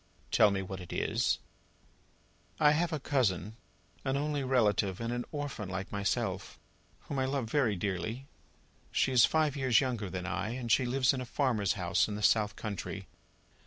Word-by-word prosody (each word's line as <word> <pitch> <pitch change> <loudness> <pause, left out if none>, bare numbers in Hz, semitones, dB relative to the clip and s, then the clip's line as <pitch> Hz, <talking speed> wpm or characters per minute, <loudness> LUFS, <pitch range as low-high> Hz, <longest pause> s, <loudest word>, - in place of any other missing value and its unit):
"Tell 105 - +6
me 95 -1 -1
what 95 0 -6
it 90 - -10
is." - - +1 1.2
"I 150 -1 +6
have 165 +3 +1
a 155 - -1
cousin, 110 -7 0 0.5
an 135 0 0
only 145 -1 -1
relative 105 -7 +2
and 115 +1 -2
an 120 0 -3
orphan, 145 -9 -4
like 95 0 -4
myself, 100 -1 -2 0.4
whom 140 - -4
I 130 - +1
love 130 -4 -2
very 120 -8 +2
dearly. 100 +7 -3 0.7
She - - +2
is 125 -3 +7
five 155 -2 +1
years 130 -4 +4
younger 120 -7 -2
than 90 -1 -4
I, 95 +4 -2
and 120 -3 -3
she 130 - +4
lives 130 +1 +3
in 130 - -3
a - - -4
farmer's 120 - +1
house 90 -2 +1
in 105 - -4
the 105 - -5
south 105 -1 +3
country. 105 -3 -5
115 Hz, 175 wpm, -31 LUFS, 100-135 Hz, 1.2 s, is